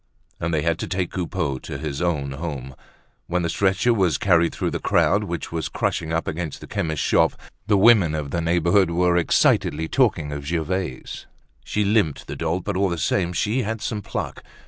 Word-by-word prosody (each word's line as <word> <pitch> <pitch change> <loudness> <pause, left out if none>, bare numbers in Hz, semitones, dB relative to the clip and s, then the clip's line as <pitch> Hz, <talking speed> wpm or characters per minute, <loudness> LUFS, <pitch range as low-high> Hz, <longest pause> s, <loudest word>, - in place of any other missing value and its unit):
And 85 - -2
they 75 -2 0
had 85 0 0
to - - -3
take 90 -2 -2
Coupeau 85 -6 -2
to 70 - -6
his 70 +1 -4
own 75 -6 0
home. 70 -3 -5 0.5
When 90 0 0
the 85 - 0
stretcher 100 +6 +2
was 95 -9 +2
carried 85 -3 +3
through - - -2
the - - -2
crowd - - +2
which - - -5
was 80 -2 -3
crushing 80 - -2
up 80 0 -1
against 80 -2 -4
the - - -10
chemist's 80 -3 -2
shop, - - +3 0.3
the 105 -2 +4
women 100 -6 +5
of 75 -3 -4
the 85 - -1
neighborhood 85 +3 +3
were 90 +1 +2
excitedly 80 -2 +2
talking 85 - +1
of 70 -1 -5
Gervaise. 85 -2 -3 0.4
She 105 -1 -1
limped, 100 -8 +1
the - - -6
dolt, 90 0 -2
but 100 - -3
all 95 +1 +2
the 85 - -2
same 85 +4 0
she 110 +7 0
had 110 0 -3
some 105 0 -3
pluck. - - -5
85 Hz, 195 wpm, -23 LUFS, 80-95 Hz, 0.5 s, women